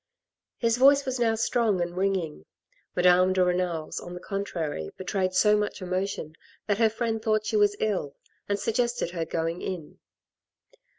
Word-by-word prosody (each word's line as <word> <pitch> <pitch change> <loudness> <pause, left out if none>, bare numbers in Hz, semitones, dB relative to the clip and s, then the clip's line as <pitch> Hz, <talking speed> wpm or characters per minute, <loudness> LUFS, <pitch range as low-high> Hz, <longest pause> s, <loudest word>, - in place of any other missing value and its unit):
His 230 -1 +1
voice 280 +2 +6
was 260 -1 -2
now 225 -2 +2
strong 225 -3 +1
and 175 0 -2
ringing. 185 - -1 0.5
Madame 180 +1 +5
de 185 -1 +3
Renal's, 180 -3 -1
on 175 - -8
the - - -6
contrary, 170 - -4
betrayed 185 -1 -1
so 210 +3 +5
much 210 0 -1
emotion 185 -3 -3 0.3
that 205 0 0
her 225 -1 +5
friend 225 0 -2
thought 215 -1 +1
she 220 - -2
was 205 -1 +4
ill, 190 -10 -1 0.3
and 200 - +1
sug 215 +3 -1
gested 240 -6 0
her 170 -2 -3
going 165 +1 -2
in. 175 -5 -6
195 Hz, 165 wpm, -27 LUFS, 180-220 Hz, 0.5 s, voice